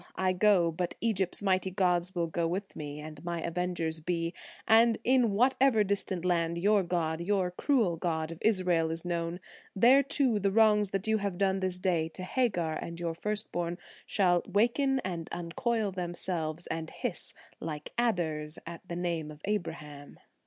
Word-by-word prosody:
I 185 0 +1
go, 185 -3 +4
but 175 +2 -3
Egypt's 200 -4 0
mighty 190 -1 +2
gods 180 -1 +1
Will 170 -1 +1
go 165 0 -1
with 190 +4 -4
me, 150 -1 -6
and 155 0 -9
my 170 -1 -3
avengers 170 -2 -2
be, 165 +1 -2 0.3
And 225 0 +5
in 250 -2 +4
whatever 250 +1 +3
distant 190 -3 -1
land 170 -1 +1
your 205 +3 +3
god, 170 -2 -1
Your 185 0 0
cruel 210 - +1
god 160 -1 -2
of 165 - -8
Israel, 180 -6 +2
is 165 +1 -4
known, 170 0 -2 0.4
There, 245 +7 +6
too, 270 -5 +1
the 200 0 +1
wrongs 210 -1 +4
that 195 0 -2
you 220 0 +2
have 200 -3 -3
done 195 0 +1
this 185 -1 -1
day 170 -4 +1
To 185 - -5
Hagar 185 -7 0
and 170 +1 -6
your 170 -1 -2
first 210 +5 -2
born, 175 0 -2 0.3
Shall 180 -4 +3
waken 265 +5 +2
and 170 -5 -5
uncoil 215 +5 -1
themselves, 175 -2 -3
and 160 0 -4
hiss - - -5 0.2
Like 150 -2 -6
adders 165 -10 -1
at 170 0 -8
the 170 - -3
name 170 -3 -2
of 150 -1 -11
Abraham." 160 -8 -4
180 Hz, 170 wpm, -30 LUFS, 165-205 Hz, 0.4 s, There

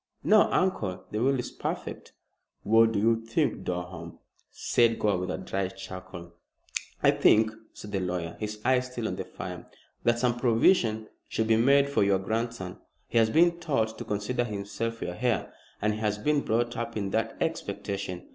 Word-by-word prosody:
"No, 215 0 +5
uncle. 105 - 0
The 105 - -2
will 135 +2 +3
is 125 - -4
perfect." - - -5 0.5
"What 115 +1 +5
do - - 0
you 115 +3 +3
think, 115 +3 0
Durham?" 90 -1 -5 0.3
said 115 -1 +2
Gore, 100 -3 +1
with 90 0 -3
a - - -2
dry 95 -1 -2
chuckle. 95 -2 -9 0.7
"I - - +7
think," 110 0 +4 0.2
said 105 - -10
the 100 - 0
lawyer, 90 -2 -3
his 105 0 -4
eyes 130 -1 +3
still 120 -3 -3
on 90 - -3
the 95 - -4
fire, 90 -1 -8 0.4
"that 120 0 +3
some 120 0 +1
provision 115 - +3 0.2
should 110 - -1
be 110 0 +4
made 140 +5 +5
for 140 - +1
your 100 -1 +3
grandson. 110 -1 -3 0.3
He 115 - +3
has 110 -1 +4
been 170 +6 +4
taught 125 -10 0
to - - -4
consider 105 +4 -1
himself 115 +1 -4
your 90 - -3
heir, 125 -3 0 0.3
and 105 0 +2
has 105 -1 -1
been 150 +6 +1
brought 120 0 0
up 115 -1 -4
in 100 -2 -2
that - - -1
expectation. 95 -3 -3
110 Hz, 175 wpm, -28 LUFS, 95-120 Hz, 0.7 s, I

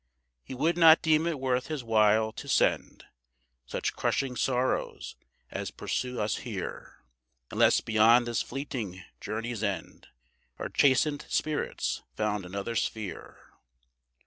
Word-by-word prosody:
He 130 - -8
would 160 +6 +1
not 165 -1 +8
deem 160 0 +3
it 160 -5 -2
worth 130 -1 0
His 155 -5 -4
while 110 -1 +3
to - - -9
send - - +1 0.6
Such - - -3
crushing 135 -2 -1
sorrows 125 0 -1 0.4
as - - -4
pursue 125 -1 -3
us 105 0 0
here, - - -7 0.5
Unless - - +4
beyond 115 +2 +4
this 120 -1 -1
fleeting 115 -9 -5 0.2
journey's 110 +1 -4
end 100 -3 -4 0.5
Our - - -4
chastened 145 +2 +2
spirits 155 -1 -1
found 105 -3 -1
another 100 +5 -4
sphere. 105 -4 -4
120 Hz, 120 wpm, -28 LUFS, 110-135 Hz, 0.6 s, not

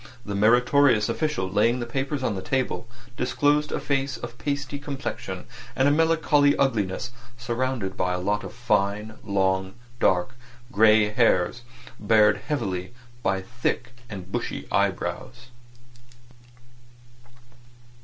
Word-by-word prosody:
This 100 - -4
meritorious 120 +2 +4
official 150 -12 -1
laying 105 +6 +2
the 120 - -3
papers 135 +3 -3
on 115 - 0
the 95 - -4
table, 130 +2 -2 0.3
disclosed 145 +4 +1
a - - -1
face 135 -1 -1
of 120 0 -8
pasty 145 -1 -3
complexion 140 -1 -5 0.3
and 130 - +3
of 145 - +4
melancholy 155 -2 +3
ugliness 115 -3 0 0.3
surrounded 120 -4 -2
by 90 0 0
a - - -1
lot 105 +3 -1
of - - -7
fine, 105 -2 -1
long 95 -2 0 0.2
dark 90 +7 +2 0.4
grey 110 -1 +5
hairs, 110 -1 +2 0.4
barred 105 -1 +4
heavily 100 - -3 0.3
by 95 -3 0
thick 120 +3 -2 0.2
and 95 -3 -8
bushy - - -3
eyebrows. 125 -1 -2
120 Hz, 120 wpm, -25 LUFS, 100-135 Hz, 0.4 s, grey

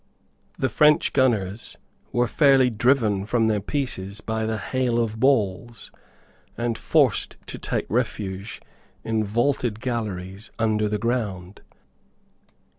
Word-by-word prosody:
The 130 - +1
French 150 +3 +3
gunners 110 -5 0 0.3
were 120 0 +2
fairly 135 0 +4
driven 110 -4 +2
from 115 +2 +1
their 110 -2 +2
pieces 100 -5 -3
by 110 0 -2
the 110 0 -1
hail 125 +2 -1
of 110 -2 -1
balls, 120 -3 0 0.7
and 120 -1 -1
forced - - +1
to - - -8
take - - -2
refuge 100 +1 -3 0.4
in 110 -1 0
vaulted 120 +1 0
galleries 105 -5 -4
under 110 -2 +1
the 105 - 0
ground. 105 -5 -3
110 Hz, 115 wpm, -24 LUFS, 105-120 Hz, 0.7 s, fairly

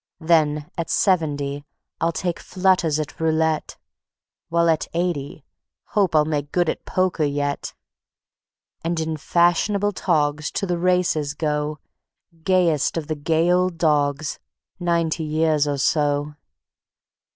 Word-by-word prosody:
Then 155 -3 +1
at 165 - -3
seventy 145 -6 +1 0.4
I'll 165 - +1
take 175 +1 -3
flutters 180 -5 +1
at 150 - -5
roulette; 160 -1 0 0.7
While 170 0 +2
at 160 -2 +1
eighty 160 -5 -2 0.4
hope 195 -6 +1
I'll 150 -1 +5
make 145 -2 -2
good 175 -2 +1
at - - -4
poker 185 -3 0
yet; 145 -1 -2 1.1
And 165 0 -1
in 160 0 -2
fashionable 175 +6 +2
togs 150 -6 0
to - - -1
the 175 -2 -1
races 175 -5 +1
go, 150 -1 -1 0.7
Gayest 175 -6 +2
of 160 - -2
the 155 - 0
gay 160 +3 +1
old 180 -1 +1
dogs, 145 -2 +1 0.4
ninety 170 -2 0
years 155 -1 +1
or 145 -1 -1
so. 145 +1 +1
160 Hz, 125 wpm, -22 LUFS, 150-175 Hz, 1.1 s, I'll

